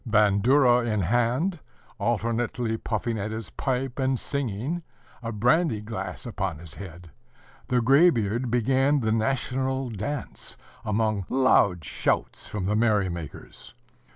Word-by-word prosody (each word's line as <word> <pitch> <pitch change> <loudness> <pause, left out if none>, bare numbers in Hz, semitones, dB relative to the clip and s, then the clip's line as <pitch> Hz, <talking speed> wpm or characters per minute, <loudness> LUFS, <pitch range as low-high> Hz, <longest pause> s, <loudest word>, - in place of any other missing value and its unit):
Bandura 120 +5 +4
in 110 -3 0
hand, 120 - +1 0.4
alternately 115 +1 0
puffing 110 0 -2
at 100 +2 -2
his 110 -2 -5
pipe 130 0 -2
and 130 -1 +1
singing, 140 - -2 0.4
a 115 -1 -4
brandy 125 - +2
glass 110 +4 -5
upon 95 -8 -3
his 80 0 -8
head, 85 -3 -10 0.6
the 125 -1 +2
gray 140 +8 +6
beard 120 - -1
began 135 +4 +2
the 110 -1 +1
national 130 +3 0
dance 115 +7 -4 0.3
amid 110 -2 0
loud 100 -10 +3
shouts - - -1
from 100 -3 -4
the 105 +2 +1
merry 105 -4 +2
makers. 85 -4 -8
115 Hz, 125 wpm, -26 LUFS, 105-130 Hz, 0.6 s, gray